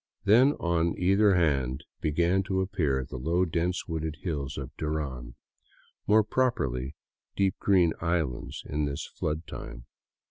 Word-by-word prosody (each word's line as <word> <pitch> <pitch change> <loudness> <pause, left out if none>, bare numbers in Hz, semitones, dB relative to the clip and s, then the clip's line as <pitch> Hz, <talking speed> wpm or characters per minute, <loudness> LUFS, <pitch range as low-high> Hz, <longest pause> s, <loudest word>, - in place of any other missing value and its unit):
Then 120 +8 +6
on 85 - 0
either 100 +2 +4
hand 70 -6 +1 0.2
began 85 +5 +2
to 95 -1 0
appear 75 -8 0
the 65 - -7
low, 85 +7 +1
dense 85 +2 -1
wooded 80 -2 -3
hills 70 -6 -3
of 70 -3 -7
Duran, 70 -6 -4 0.7
more 110 +1 +5
properly 70 - 0 0.4
deep 95 -1 +2
green 90 -5 +4
islands 75 -6 -2
in 75 +1 -1
this 70 -1 -3
flood 75 +2 -3
time. - - -8
80 Hz, 135 wpm, -28 LUFS, 70-95 Hz, 0.7 s, Then